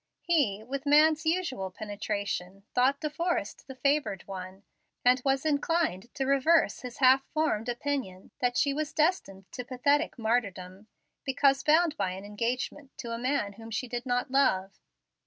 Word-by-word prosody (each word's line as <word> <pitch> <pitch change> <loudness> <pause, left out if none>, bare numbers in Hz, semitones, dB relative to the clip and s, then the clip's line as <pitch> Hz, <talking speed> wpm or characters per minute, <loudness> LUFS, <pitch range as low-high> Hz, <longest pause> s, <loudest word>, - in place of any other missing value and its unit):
He, 265 - +1
with 275 +4 -5
man's 305 +2 +5
usual 320 - -1
penetration, 200 -2 -4
thought 265 +3 +3
De 305 - -1
Forrest 310 - -3
the 265 - -8
favored 280 -8 0
one, 190 0 -8 0.4
and 250 +1 +5
was 270 +1 +1
inclined 290 - 0
to 270 -2 -1
reverse 275 +5 +3
his 250 -2 -8
half 265 0 +5
formed 250 -8 0
opinion 240 -7 -3
that 245 -1 0
she 280 - +2
was 305 +2 -3
destined 300 - 0
to 250 - -5
pathetic 285 +5 +1
martyrdom, 200 -4 -2 0.4
because 270 0 +2
bound 315 +1 +3
by 190 -2 -1
an 190 +2 -8
engagement 245 +6 -4
to 235 - -6
a 230 - -4
man 250 -5 -1
whom 225 +2 -11
she 225 +3 -3
could 240 +1 -5
not 250 +1 0
love. 200 -9 +1
255 Hz, 155 wpm, -29 LUFS, 205-285 Hz, 0.4 s, man's